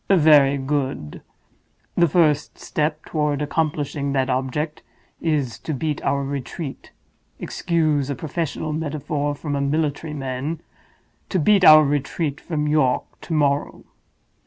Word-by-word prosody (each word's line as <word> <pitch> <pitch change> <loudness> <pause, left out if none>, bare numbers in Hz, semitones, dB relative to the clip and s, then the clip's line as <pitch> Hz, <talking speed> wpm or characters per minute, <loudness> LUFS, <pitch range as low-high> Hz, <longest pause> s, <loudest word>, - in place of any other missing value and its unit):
"Very 150 -6 +6
good. 135 - -3 0.7
The 170 - +4
first 150 -2 +2
step 155 0 -2
toward 150 -2 -1
accomplishing 145 -2 -1
that 135 -1 +1
object 135 +4 -2 0.4
is 145 -7 -1
to 155 - -4
beat 150 +2 -2
our 140 0 0
retreat—excuse 145 +2 -3
a 140 - -1
professional 155 +2 -3
metaphor 150 -1 -2
from 145 0 -4
a 140 - -1
military 150 +1 -1
man—to 140 +7 -6
beat 200 +4 +4
our 155 -2 +9
retreat 145 +1 -2
from 150 -3 -2
York 150 -4 +2 0.2
to 170 - -5
morrow. 145 -2 0
150 Hz, 115 wpm, -22 LUFS, 140-155 Hz, 0.7 s, our